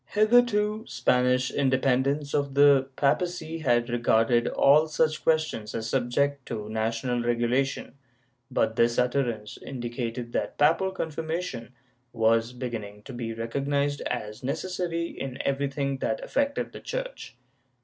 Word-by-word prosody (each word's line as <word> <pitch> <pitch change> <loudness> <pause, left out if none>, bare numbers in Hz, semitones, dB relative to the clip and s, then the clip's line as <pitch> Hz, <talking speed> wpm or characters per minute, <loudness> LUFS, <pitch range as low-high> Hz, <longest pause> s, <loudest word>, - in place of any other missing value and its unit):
^ - - -19
Hitherto 215 -1 +3
Spanish 125 0 +2
independence 135 +1 +1
of 140 -1 0
the 140 -2 +5
papacy 165 +2 0
had 120 -5 +2
regarded 120 0 +2
all 150 +3 +4
such 155 0 0
questions 155 -9 0
as 115 0 -3
subject 135 +2 0
to 105 -3 -5
national 115 +3 -1
regulation, 120 +3 0 0.6
but 110 0 0
this 115 0 +3
utterance 120 -4 -1
indicated 120 -2 -5
that - - -2
papal 165 +6 +3
confirmation 160 -7 -4 0.4
was 115 0 +2
beginning 115 -5 -6
to 135 - -9
be 120 -2 -4
recognized 140 +5 -1
as 105 -3 -4
necessary 170 +4 -2
in 135 -5 -6
everything 140 0 -1
that 135 - -2
affected 280 0 -1
the - - -9
Church. - - -6
135 Hz, 125 wpm, -27 LUFS, 120-155 Hz, 0.6 s, the